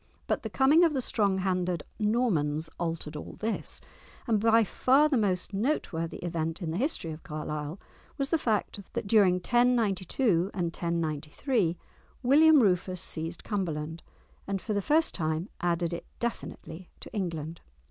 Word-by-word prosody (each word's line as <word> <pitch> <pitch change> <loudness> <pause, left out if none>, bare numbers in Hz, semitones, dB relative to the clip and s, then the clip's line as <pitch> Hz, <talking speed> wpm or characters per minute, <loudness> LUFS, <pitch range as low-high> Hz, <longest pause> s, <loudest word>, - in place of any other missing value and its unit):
But - - 0
the - - -5
coming 290 +6 +5
of 330 -3 +4
the - - +1
strong 200 -5 +1
handed 180 -3 0 0.2
Normans 165 -9 +1
altered 165 -2 -3
all 150 - -7
this; 220 +1 -2 0.5
and 225 -4 +2
by 225 +1 +5
far 265 +8 +3
the 300 - +1
most 200 -4 0
noteworthy 195 - -1
event 165 -1 -2
in 170 -4 -3
the 165 - -2
history 245 - -1
of 155 +1 -8
Carlisle 150 +2 -5 0.4
was 275 -1 -1
the 330 - +2
fact 215 -4 -1
that - - -2
during 200 -3 +5
1092 205 -3 +2
and 170 -3 -1
1093 170 - -1 0.5
William 295 +2 +6
Rufus 185 -2 +1
seized 165 +2 -4
Cumberland, 165 -6 -3 0.5
and 195 0 -1
for 215 - -3
the 205 - +1
first 315 - +2
time 160 +2 -2
added 170 -1 0
it 170 - -6
definitely 180 -7 -5
to - - -11
England. 165 -5 -4
185 Hz, 150 wpm, -29 LUFS, 165-230 Hz, 0.5 s, William